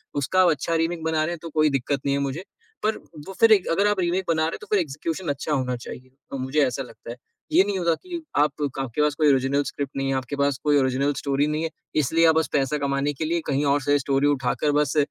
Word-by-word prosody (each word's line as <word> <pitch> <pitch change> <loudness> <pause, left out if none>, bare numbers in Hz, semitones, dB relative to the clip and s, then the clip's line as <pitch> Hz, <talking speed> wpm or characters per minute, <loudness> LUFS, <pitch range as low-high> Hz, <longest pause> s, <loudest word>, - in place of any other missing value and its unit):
उसका 150 +7 +2
आप 180 - +5
अच्छा 155 +3 -1
रीमेक 165 -1 -3
बना 160 -1 +1
रहे 170 - -2
हैं 170 - -7
तो 165 - -7
कोई 155 0 +2
दिक्कत 135 +1 -1
नहीं 140 0 +1
है 140 - -1
मुझे। 140 +6 -3 0.4
पर 215 0 +1 0.3
वो 195 - -7
फिर 225 -1 +6
एक 195 -3 +2
अगर 200 +5 +2
आप 205 -2 +1
रीमेक 180 +2 0
बना 160 -1 +1
रहे 160 - 0
हो - - -7
तो - - -11
फिर 205 - +4
एग्ज़िक्यूशन 160 +2 -3
अच्छा 145 +2 -3
होना 130 -2 0
चाहिए। 130 +2 -10 0.2
अ, - - -1
मुझे 135 +2 +1
ऐसा 130 +2 -3
लगता 120 - -13
है। 120 - -7 0.4
ये 190 - +6
नहीं 200 -1 -2
होता 170 -1 +2
कि 345 - -7 0.2
आप 150 0 +4 0.3
क - - -3
आपके 135 +2 -2
पास 150 - +3
कोई 155 -2 +3
ओरिजिनल 135 +2 +1
स्क्रिप्ट 140 -1 -5
नहीं 135 0 -1
है, - - +1
आपके 130 +1 -3
पास 140 -1 +1
कोई 145 -1 +3
ओरिजिनल 135 +2 +1
स्टोरी 140 +1 0
नहीं 155 +1 -1
है, 165 - -1 0.3
इसलिए 160 +3 +3
आप 160 - +4
बस 160 -3 +2
पैसा 140 +1 +1
कमाने 140 +1 -1
के 155 - -4
लिए 170 +1 0
कहीं 140 +2 0
और 140 +1 +2
से 145 +2 +2
स्टोरी 140 +1 +1
उठाकर 140 +1 0
बस 150 +1 -1
145 Hz, 265 wpm, -24 LUFS, 135-165 Hz, 0.4 s, फिर